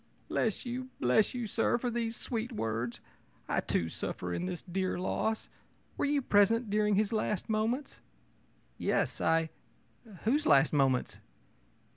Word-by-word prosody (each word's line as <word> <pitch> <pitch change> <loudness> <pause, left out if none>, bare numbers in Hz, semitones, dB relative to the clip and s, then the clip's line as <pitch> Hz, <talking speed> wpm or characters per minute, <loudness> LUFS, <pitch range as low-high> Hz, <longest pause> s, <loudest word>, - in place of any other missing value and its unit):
ō'Bless 220 +1 0
you! 255 +1 -4
bless 125 - +3
you, 245 -2 -2
sir, 225 +2 +1
for 245 0 -2
these 230 -1 -2
sweet 235 0 -3
words! 115 - -3 0.5
I, - - +1
too, 85 - 0
suffer 90 +2 -4
in 180 - -2
this 180 -2 -4
dear 185 +1 -1
loss. 220 +4 -1 0.5
Were - - 0
you 285 -1 +1
present 215 +1 +3
during 210 0 +3
his 215 +2 +1
last 215 -2 -1
moments?' 225 +6 -1 0.8
ō'Yes. - - 0
I 160 0 +2 0.7
whose 280 +8 +2
last 140 +1 +5
moments?' 135 -3 +2
215 Hz, 140 wpm, -31 LUFS, 165-235 Hz, 0.8 s, last